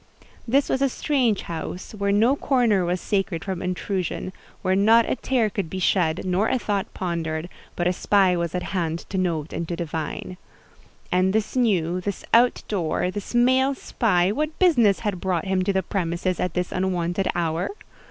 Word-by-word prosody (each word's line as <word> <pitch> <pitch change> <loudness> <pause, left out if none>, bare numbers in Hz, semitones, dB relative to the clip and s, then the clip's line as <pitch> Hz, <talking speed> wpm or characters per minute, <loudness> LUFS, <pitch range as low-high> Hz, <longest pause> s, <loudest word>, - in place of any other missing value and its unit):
This 275 +5 +3
was 265 - 0
a 275 - +3
strange 250 -7 0
house, 170 +2 -6
where 200 -1 -1
no 225 +7 +4
corner 240 -9 +2
was 180 +1 0
sacred 195 -4 -1
from 190 -3 -3
intrusion, 185 0 -3 0.3
where 185 0 +2
not 225 +4 +5
a - - 0
tear 250 -4 +1
could 200 -5 -3
be 190 - -5
shed, 175 -3 +1
nor 185 +4 +1
a 260 - +2
thought 205 -5 -2
pondered, 165 -2 -3 0.3
but 175 - -1
a 180 - +2
spy 190 -1 +3
was 170 0 -2
at 180 - -2
hand 170 -3 -2
to 190 - -1
note 165 -4 -1
and 170 - -3
to 170 - -3
divine. 165 +2 -4 0.7
And 185 +1 +2
this 220 +3 -1
new, 185 -8 +1
this 200 +1 -4
out 240 +2 +4
door, 180 -2 -1
this 205 +4 -6
male 260 +3 +4
spy, 190 -8 +1
what 305 +7 -2
business 240 - +4
had 205 -5 -2
brought 185 -3 -1
him 190 -1 +1
to 200 - +2
the 190 -1 0
premises 180 -1 -2
at 180 -2 -2
this 180 0 -1
unwonted 185 0 -1
hour? 170 0 -1
190 Hz, 180 wpm, -24 LUFS, 175-220 Hz, 0.7 s, not